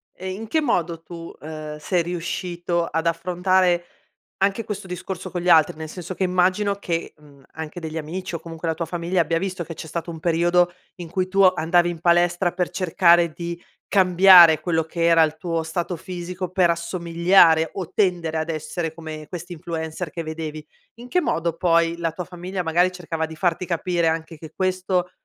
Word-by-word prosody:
E 185 +1 -6
in 215 +4 -6
che 315 +6 +1
modo 170 - -1
tu, 165 0 -9
ehm, 155 0 -7
sei 175 +2 0
riuscito 175 0 -2
ad 165 +1 -2
affrontare 180 +1 +1 0.6
anche 200 +3 +1
questo 210 -3 -6
discorso 180 +1 -6
con 175 -2 -3
gli 180 - 0
altri? 160 -4 +5
Nel 160 0 -7
senso 180 +2 -7
che 190 - -2
immagino, 185 +3 +2
che, 170 -4 -3
mhmm, 145 -2 -19
anche 160 +2 -7
degli 160 -1 -6
amici 170 +3 -5
o - - -3
comunque 165 0 -7
la 160 - 0
tua 165 - -3
famiglia, 175 +2 -1
abbia 165 0 0
visto 185 -2 -3
che 165 - -8
c'è 160 - -9
stato 170 +2 -5
un 160 - -8
periodo 175 +2 +2 0.2
in 175 -3 -9
cui 185 +1 -1
tu 195 +1 -2
o 185 0 +6
andavi 175 +1 +2
in 170 -2 -5
palestra 175 +1 +2
per 180 0 -2
cercare 175 -2 +3
di 170 0 -5 0.3
cambiare 180 -4 +7
quello 160 0 0
che 165 +1 -4
era 165 -1 +6
il 155 0 0
tuo 165 -1 -2
stato 170 +2 -3
fisico 180 +1 -6
per 180 -1 +3
assomigliare 170 -1 +3
o 180 -3 -5
tendere 175 -5 +1
ad 160 +1 -2
essere 160 +1 -3
come 155 -2 -8
questi 175 +1 -7
influencer 160 0 -5
che 165 - -5
vedevi. 155 -1 -6 0.3
In 240 +2 -11
che 360 - +2
modo 170 - -1
poi 170 -1 +2
la 165 -1 -1
tua 180 +2 -5
famiglia, 180 +1 -5
magari, 175 +3 +2
cercava 165 -3 -4
di 160 0 -9
farti 175 +2 0
capire 175 -1 0
anche 160 0 -2
che 155 0 -11
questo 185 -1 0
170 Hz, 195 wpm, -23 LUFS, 165-180 Hz, 0.6 s, cambiare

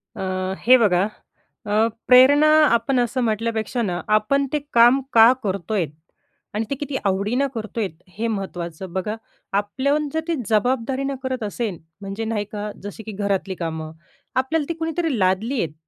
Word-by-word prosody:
अ, - - -10 0.5
हे 255 +2 +8
बघा, 190 -6 +3 0.6
अ, 215 +2 +2 0.2
प्रेरणा 270 +4 +7 0.3
आपण 235 +3 +2
असं 245 +1 0
म्हटल्यापेक्षा 225 +1 -1
ना, 180 -6 -2 0.2
आपण 275 +7 +1
ते 300 - +2
काम 240 +3 +6
का 225 +1 +8
करतोय? 195 -1 -1 0.7
आणि 215 +2 -1
ते 275 - -1
किती 285 0 -5
आवडीनं 205 +8 +1
करतोयत 220 -2 -3 0.3
हे 230 +2 -1
महत्त्वाचं. 185 -4 -5
बघा, 190 +3 -2 0.4
आपल्याहून 265 +9 0
जर 320 - +1
ते 335 - 0
जबाबदारीनं 260 +5 0
करत 260 -3 -2
असेन, 210 -2 -3 0.2
म्हणजे 200 +3 -5
नाही 220 -2 -2
का, 210 0 -4
जसे 205 +2 -7
की 220 - -7
घरातली 195 -1 -2
कामं, 160 -2 -4 0.4
आपल्याला 285 +4 +1
ती - - 0
कुणीतरी 325 -3 -1
लादली 200 +8 +1
आहेत 160 - -3
225 Hz, 150 wpm, -22 LUFS, 200-260 Hz, 0.7 s, हे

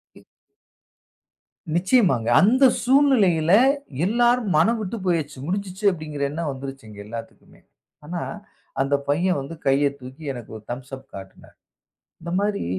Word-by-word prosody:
இ - - -18 1.5
நிச்சியமாக, 175 - +3 0.2
அந்த 250 +8 +4 0.2
சூழ்நிலையில 240 - +3 0.5
எல்லாரும் 240 +1 +2
மனம்விட்டு 220 +5 +1
போயச்சு. 155 -6 -1
"முடிஞ்சுச்சு," 195 +3 -4
அப்படிங்கிற 150 -4 -5
என்னோ 165 +3 -4
வந்துருச்சு, 135 -2 -8
எங்க 105 -1 -12
எல்லாத்துக்குமே. 115 +1 -10 0.4
ஆனா, 170 +2 -4 0.6
அந்த 135 +1 +1
பையன் 175 +3 +1
வந்து 140 +5 -8
கையை 140 +1 +3
தூக்கி, 130 +5 -11
எனக்கு 120 -3 -10
ஒரு 110 - -15
தம்ஸ் 130 +2 -7
அப் 135 0 -15
காட்டினான். 95 -1 -12 0.7
இந்த 170 +1 -7
மாரி 205 0 -1
165 Hz, 120 wpm, -23 LUFS, 135-200 Hz, 1.5 s, அந்த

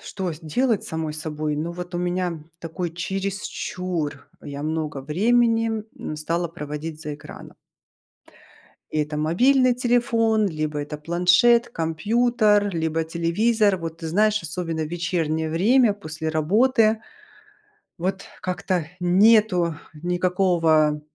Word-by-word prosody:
что 190 -3 -4
делать 220 - +1
с - - -7
самой 160 -1 -3
собой, 155 -1 -3
но 160 +3 -3
вот 180 +1 -7
у - - -1
меня, 175 -2 -2 0.2
такой, 170 +1 -4
чересчур, 185 -2 -4
я 140 0 -6
много 155 -2 -2
времени, 225 - +2 0.2
м, 155 - -5
стала 170 +3 -2
проводить 155 -1 -6
за 150 -1 -4
экраном. 145 - -12 1.3
Это 150 0 -1
мобильный 250 - +3
телефон, 235 -3 +2
либо 155 -3 -3
это 150 +1 -5
планшет, 180 +9 +3
компьютер, 210 +4 +1
либо 160 0 -1
телевизор. 200 +6 +1
Вот 165 -2 -6
ты 165 - -6
знаешь, 215 +4 +2
особенно 165 0 -3
в - - -5
вечернее 160 -2 -1
время, 220 +8 +4
после 160 -5 -5
работы. 215 - +3 1.0
Вот, 190 +3 -2 0.2
как-то 180 -2 -1
нету 185 -1 +4 0.3
никакого, 175 -4 +2
175 Hz, 115 wpm, -23 LUFS, 160-210 Hz, 1.3 s, время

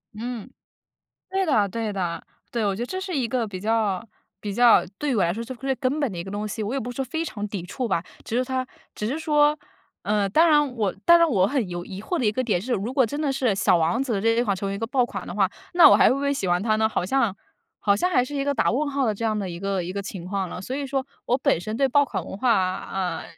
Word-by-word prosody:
嗯， 235 +1 -5 0.8
对 385 0 +1
的， 220 - +2
对 220 +1 -3
的。 175 -4 -3 0.3
对， 235 -2 0
我 200 -1 +1
觉 - - -7
得 - - -2
这 375 +7 -4
是 375 -3 -3
一 260 -4 +1
个 235 0 -1
比 195 -3 -6
较 215 -1 0 0.3
比 205 -2 -4
较 240 +1 +6
对 290 -3 0
我 200 - +3
来 170 - +1
说 230 - -4
是 235 +3 -6
最 270 +2 -1
根 260 +4 -1
本 285 -5 0
的 - - -7
一 170 - -3
个 190 - -8
东 205 +1 -3
西， 215 +1 -4
我 210 +3 -3
也 275 - 0
不 245 -1 -4
是 - - -16
说 270 - -1
非 320 +6 -3
常 210 -9 -4
抵 200 -3 -4
触 240 +7 -4
吧， 170 -4 0 0.2
只 225 - -3
是 255 - +2
它 260 0 -2 0.3
只 - - -5
是 275 +6 -2
说， 300 -1 +3 0.4
呃， 205 -1 +1
当 320 - +4
然 295 -4 +3
我 205 -5 0
当 340 0 +7
然 335 0 +4
我 195 -8 +3
很 255 -6 -1
有 175 0 -5
疑 190 +1 -8
惑 355 - -3
的 260 - -1
一 210 - +4
个 255 +5 -2
点 210 -7 +1
是 250 +4 -3
如 230 +4 -2
果 265 -2 +4
真 290 +6 -3
的 290 -3 0
是 260 -4 +1
小 195 -3 +4
王 170 +8 +1
子 240 -7 -1
这 225 - +1
一 - - +4
款 200 - +1
成 195 +1 -3
为 195 - -2
一 - - -6
个 225 - -2
爆 250 +1 +2
款 240 - -6
的 - - -6
话， 195 -2 +2 0.2
那 345 -3 +9
我 - - +7
还 - - +6
会 - - +3
不 275 - -3
会 280 0 +1
喜 270 -9 -2
欢 175 +1 +1
它 215 0 +2
呢？ 220 0 +2
好 215 - -1
像 230 -1 +1 0.4
好 200 -1 +3
像 360 - +1
还 270 -9 +3
是 290 +3 -6
一 275 - 0
个 285 0 0
打 - - +2
问 290 +5 0
号 280 -1 0
的 220 - +2
这 210 +3 -5
样 220 -1 +1
的 195 -3 -3
一 170 - -6
个 195 0 -1
一 175 +2 -5
个 200 - -3
情 195 -3 -7
况 190 0 -2
了。 180 - -7
所 255 +7 -4
以 285 -1 -3
说 270 0 -1 0.2
我 245 - +3
本 255 -10 +1
身 215 +5 -4
对 270 +2 +2
爆 285 +3 +4
款 - - -4
文 190 - -8
化 195 -6 +2 0.2
呃， 180 -4 -2
230 Hz, 320 characters per minute, -24 LUFS, 200-270 Hz, 0.8 s, 那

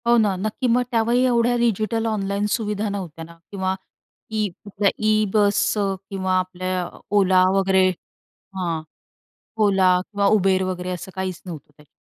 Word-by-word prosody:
हो, 240 0 +5
ना. 210 -4 +2
नक्की, 215 +7 -2
मग 245 +1 +3
त्यावेळी 235 +2 +2
एवढ्या 240 -1 +2
डिजिटल 225 -1 0
ऑनलाईन 200 -1 -1
सुविधा 210 0 -1
नव्हत्या 180 -5 -6
ना, 170 - -14 0.2
किंवा 190 -1 -1 0.6
ई 215 -1 +1 0.6
ई 215 0 +3
बस 205 -1 +3 0.4
किंवा 190 -1 0
आपल्या 185 0 -3 0.3
Ola 185 -2 +5
वगैरे 190 -1 +3 0.7
हां, 170 -4 -2 0.8
Ola 190 -2 +4
किंवा 200 +1 -1
Uber 190 -1 +2
वगैरे 180 0 -5
असं 180 +1 -6
काहीच 190 -2 -4
नव्हतं 160 -6 -8
त्याच्यात. 150 - -19
195 Hz, 140 wpm, -22 LUFS, 185-215 Hz, 0.8 s, हो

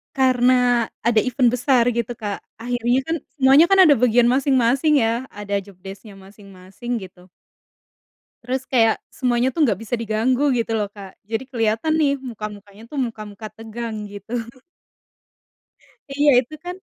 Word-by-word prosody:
Karena 250 -2 +3 0.2
ada 230 -1 +3
event 250 +2 +2
besar 250 0 +2
gitu, 235 0 -3
Kak, 205 -3 -5 0.2
akhirnya 245 +1 0
kan 325 - 0 0.2
semuanya 275 +3 +6
kan 390 +1 +4
ada 305 -5 +6
bagian 240 0 +3
masing-masing 265 +2 +2
ya, 230 +3 -1
ada 205 0 -4
jobdesk-nya 195 +2 -12
masing-masing, 195 +2 -11
gitu. 180 -1 -13 1.2
Terus 260 +2 -3
kayak 225 -4 +3
semuanya 250 0 0
tuh 300 +4 +1
nggak 205 -7 0
bisa 225 +2 -2
diganggu, 245 +5 +1
gitu 230 -2 -1
loh, 210 - 0
Kak, 195 -2 -12
jadi 225 +4 -3
keliatan 230 +5 0
nih, 290 -3 +2
muka-mukanya 210 -4 -9
tuh, 290 - -9
muka-muka 215 -2 -6
tegang, 225 -1 -7
gitu. 205 +3 -8 1.7
Iya, 285 +1 +3
itu 260 +5 -11
kan 360 +1 -6
235 Hz, 140 wpm, -21 LUFS, 215-260 Hz, 1.7 s, semuanya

